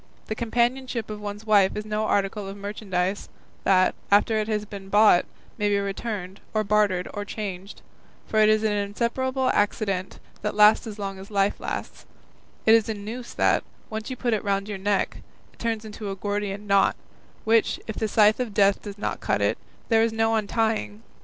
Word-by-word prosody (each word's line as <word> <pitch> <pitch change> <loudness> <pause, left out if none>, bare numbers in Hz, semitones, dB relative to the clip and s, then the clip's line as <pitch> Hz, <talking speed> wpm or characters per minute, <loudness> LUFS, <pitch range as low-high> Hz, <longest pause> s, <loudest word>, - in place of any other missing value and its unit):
The - - -3
companionship 235 0 -1
of 210 0 -6
one's 205 +1 -6
wife 205 -3 +4
is 210 - -4
no 215 0 -1
article 200 0 0
of 195 +1 -7
merchandise, 200 -2 -3 0.4
that, 185 -1 +4 0.2
after 215 +2 +4
it 215 - -1
has 210 -1 -1
been 195 -2 -9
bought, 205 -3 +5 0.3
may 205 0 +2
be 205 - +2
returned, 200 -1 -4 0.2
or 215 - +2
bartered, 205 -3 +2
or 205 - -3
changed; 200 -2 -6 0.4
for 220 - 0
it 215 0 +6
is 215 0 +3
an 215 - +2
inseparable 235 +6 0
accident 200 -2 0 0.2
that 210 - -2
lasts 210 +2 +6
as 215 -1 -7
long 195 -2 -5
as 195 - -10
life 200 -1 +1
lasts; - - -6 0.6
it 220 - +7
is 225 -1 +4
a 220 - -1
noose 225 +4 -7
that, - - +3 0.3
once 220 +2 -4
you 260 - -4
put 240 -1 -1
it 215 - -1
round 200 -1 0
your 205 -2 -5
neck, 200 0 0 0.4
turns 225 -1 -2
into 210 -1 -6
a 195 - -3
Gordian 205 0 -3
knot, 200 -1 +3 0.5
which, 225 0 +2
if 220 - -5
the 220 - -1
scythe 215 +1 +4
of 235 -5 -3
Death 200 -1 +4
does 205 -1 -8
not 205 - -3
cut - - 0
it, - - +2 0.3
there 225 -1 +5
is 225 0 +2
no 225 0 +1
untying. 220 0 -1
210 Hz, 190 wpm, -25 LUFS, 200-220 Hz, 0.6 s, it